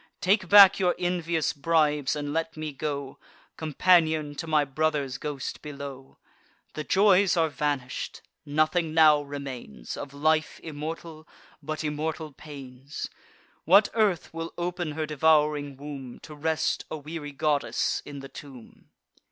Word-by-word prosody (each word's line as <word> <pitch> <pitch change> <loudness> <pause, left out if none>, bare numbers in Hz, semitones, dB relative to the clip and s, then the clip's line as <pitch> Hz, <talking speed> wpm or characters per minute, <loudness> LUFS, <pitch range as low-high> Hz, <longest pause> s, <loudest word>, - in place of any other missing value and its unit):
Take 190 0 +2
back 200 -2 +9
your 180 -2 +2
envious 170 -3 0
bribes, 150 -1 +1
and 145 -1 -4
let 165 0 -2
me 155 -1 -4
go 140 -1 -5 0.4
Companion 160 -1 +2
to 155 +3 -6
my 155 -2 +3
brother's 140 -2 -1
ghost 145 -3 -5
below! 140 -2 -9 0.6
The 155 - -4
joys 195 +1 +4
are 165 -1 +3
vanish'd: 140 -3 -3 0.2
nothing 155 +2 +1
now 155 -2 +6
remains, 140 - -7
Of 140 - -7
life 155 +2 +1
immortal, 160 +1 -7 0.3
but 155 +2 -4
immortal 155 +1 -3
pains. 135 -1 -8 0.5
What 200 +5 +6
earth 210 -9 +1
will 165 0 -6
open 175 -2 -3
her 155 +1 -2
devouring 150 -2 +2
womb, 140 -3 -8
To 155 - -10
rest 155 +1 -1
a 155 - -4
weary 150 0 -7
goddess 145 0 0
in 140 -1 -8
the 135 - -8
tomb!" 135 -6 -13
155 Hz, 135 wpm, -27 LUFS, 145-165 Hz, 0.6 s, back